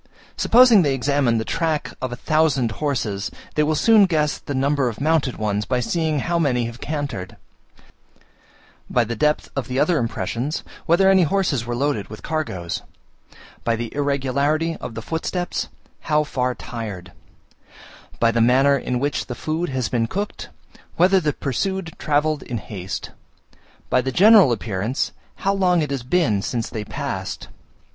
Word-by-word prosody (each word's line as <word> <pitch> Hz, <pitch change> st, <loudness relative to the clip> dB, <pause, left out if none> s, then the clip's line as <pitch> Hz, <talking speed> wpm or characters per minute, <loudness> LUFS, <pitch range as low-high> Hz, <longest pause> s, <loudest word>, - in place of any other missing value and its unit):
Supposing 240 Hz, -3 st, +6 dB
they 140 Hz, -5 st, +1 dB
examine 135 Hz, -3 st, +1 dB
the 110 Hz, -, -2 dB
track 160 Hz, -3 st, -1 dB
of 130 Hz, -1 st, -3 dB
a -, -, -3 dB
thousand 140 Hz, -4 st, +1 dB
horses, 115 Hz, -8 st, -1 dB, 0.2 s
they 150 Hz, -, +1 dB
will 155 Hz, +1 st, +2 dB
soon 215 Hz, +3 st, +5 dB
guess 150 Hz, -4 st, 0 dB
the 145 Hz, -, -5 dB
number 135 Hz, -1 st, +1 dB
of 110 Hz, -, -8 dB
mounted 150 Hz, -3 st, +1 dB
ones 105 Hz, -1 st, -1 dB
by 125 Hz, +2 st, -1 dB
seeing 155 Hz, +4 st, 0 dB
how 170 Hz, +3 st, 0 dB
many 125 Hz, -7 st, +1 dB
have 115 Hz, +1 st, -8 dB
cantered; 140 Hz, -11 st, -4 dB, 1.5 s
by 120 Hz, -, +3 dB
the 115 Hz, +1 st, -4 dB
depth 150 Hz, +7 st, +1 dB
of 135 Hz, -4 st, -2 dB
the 125 Hz, -, -3 dB
other 155 Hz, +3 st, +3 dB
impressions, 120 Hz, -, -2 dB, 0.2 s
whether 175 Hz, +4 st, +4 dB
any 190 Hz, -1 st, +6 dB
horses 160 Hz, -, +1 dB
were 120 Hz, -, -2 dB
loaded 135 Hz, -5 st, -1 dB
with 110 Hz, -, -10 dB
cargoes; 95 Hz, -, -3 dB, 0.8 s
by 115 Hz, 0 st, +1 dB
the 115 Hz, 0 st, -5 dB
irregularity 145 Hz, +3 st, 0 dB
of 115 Hz, -, -7 dB
the 115 Hz, -, -6 dB
footsteps, 175 Hz, +4 st, -2 dB, 0.3 s
how 150 Hz, -1 st, +1 dB
far 125 Hz, -4 st, -1 dB
tired; 105 Hz, -7 st, -7 dB, 1.1 s
by 115 Hz, 0 st, +4 dB
the 115 Hz, 0 st, +1 dB
manner 135 Hz, +4 st, +5 dB
in 125 Hz, -2 st, -2 dB
which 145 Hz, +2 st, -1 dB
the 125 Hz, -, -5 dB
food 160 Hz, +6 st, -2 dB
has 130 Hz, -4 st, -1 dB
been 115 Hz, 0 st, 0 dB
cooked, 200 Hz, -, -4 dB, 0.5 s
whether 190 Hz, +3 st, +5 dB
the 155 Hz, -4 st, 0 dB
pursued 170 Hz, +6 st, -3 dB
travelled 150 Hz, 0 st, +1 dB
in 120 Hz, -, -4 dB
haste; 95 Hz, -3 st, -6 dB, 0.8 s
by 125 Hz, -, +4 dB
the 130 Hz, -, -2 dB
general 200 Hz, -, +7 dB
appearance, 110 Hz, +2 st, -2 dB, 0.3 s
how 195 Hz, -, +3 dB
long 180 Hz, -3 st, +3 dB
it 150 Hz, -, -4 dB
has 135 Hz, -2 st, -2 dB
been 125 Hz, -, +1 dB
since 115 Hz, +2 st, -3 dB
they 110 Hz, -, -4 dB
passed. -, -, -5 dB
140 Hz, 160 wpm, -22 LUFS, 120-160 Hz, 1.5 s, general